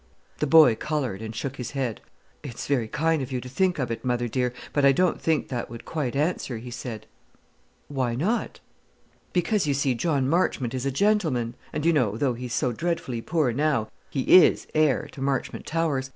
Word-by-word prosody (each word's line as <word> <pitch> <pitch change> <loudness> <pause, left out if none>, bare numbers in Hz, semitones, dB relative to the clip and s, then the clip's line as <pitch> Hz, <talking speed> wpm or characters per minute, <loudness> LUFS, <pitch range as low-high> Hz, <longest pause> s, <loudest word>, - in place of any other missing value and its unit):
The 150 - 0
boy 155 -5 +7
coloured, 130 -6 -3
and 110 0 -6
shook 135 +4 -4
his 125 +2 -6
head. 125 -6 -2 0.4
"It's 125 -5 -7
very 130 -6 0
kind 160 +4 +1
of 130 0 -5
you 130 - -1
to 125 - -8
think 180 +8 +1
of 130 -5 -2
it, 115 - -4
mother 120 -1 0
dear; 125 +1 0 0.2
but 145 - +1
I 140 - +7
don't 180 +6 +1
think 160 -2 0
that 125 -2 -3
would 115 -1 -9
quite 140 -6 -3
answer," 145 -4 -1
he 120 +2 -8
said. 120 -3 -6 0.8
"Why 130 -4 -1
not?" 200 - -1 0.7
"Because, 180 0 +1
you 140 - +2
see, 135 -1 +1
John 140 0 0
Marchmont 140 -6 +1
is 130 +1 -2
a - - 0
gentleman; 150 - +1 0.2
and, 150 +1 -3
you 170 - +4
know, 115 -8 +1
though 130 0 +1
he's 120 -1 -5
so 125 - +1
dreadfully 130 -4 -2
poor 155 -2 +1
now, 135 -4 +1 0.2
he 135 - -2 0.2
is - - +2
heir 155 -1 +2
to 135 - -10
Marchmont 135 -1 -2
Towers. 150 -5 -1
135 Hz, 195 wpm, -25 LUFS, 120-155 Hz, 0.8 s, boy